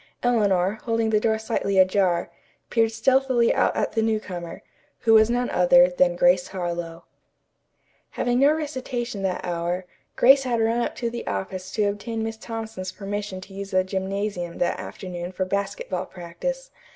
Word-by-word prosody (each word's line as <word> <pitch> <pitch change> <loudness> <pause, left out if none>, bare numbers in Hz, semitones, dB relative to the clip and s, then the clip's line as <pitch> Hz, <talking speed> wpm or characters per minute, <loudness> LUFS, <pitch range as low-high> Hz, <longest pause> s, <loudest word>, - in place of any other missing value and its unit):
Eleanor, 205 -4 +2
holding 225 -1 +1
the 215 - +4
door 220 0 +1
slightly 220 -3 -1
ajar, 185 -2 +3 0.4
peered 225 -1 +3
stealthily 255 +1 +3
out - - +2
at - - 0
the 225 - 0
new 220 -1 +1
comer, 175 -5 -7 0.4
who 225 - +4
was 220 0 +6
none 245 +1 +1
other 175 0 +6
than 180 0 +2
Grace 180 +1 +3
Harlowe. 175 -2 -4 1.1
Having 245 0 0
no 280 +2 +6
recitation 260 -8 -3
that 190 -1 -2
hour, 175 +1 -2 0.3
Grace 270 +3 +6
had 245 -3 -1
run 225 +1 +2
up 240 - -2
to 235 -1 -3
the 235 0 -6
office 185 -1 -4
to 215 - +1
obtain 205 +3 -2
Miss 225 0 -4
Thompson's 220 -5 -6
permission 205 -1 -5
to 190 +1 -12
use 195 0 -6
the 185 -1 +2
gymnasium 190 -2 -3
that 175 - 0
afternoon 180 -1 -6
for 185 0 -2
basketball 195 -1 -3
practice. - - -5
200 Hz, 165 wpm, -24 LUFS, 185-230 Hz, 1.1 s, was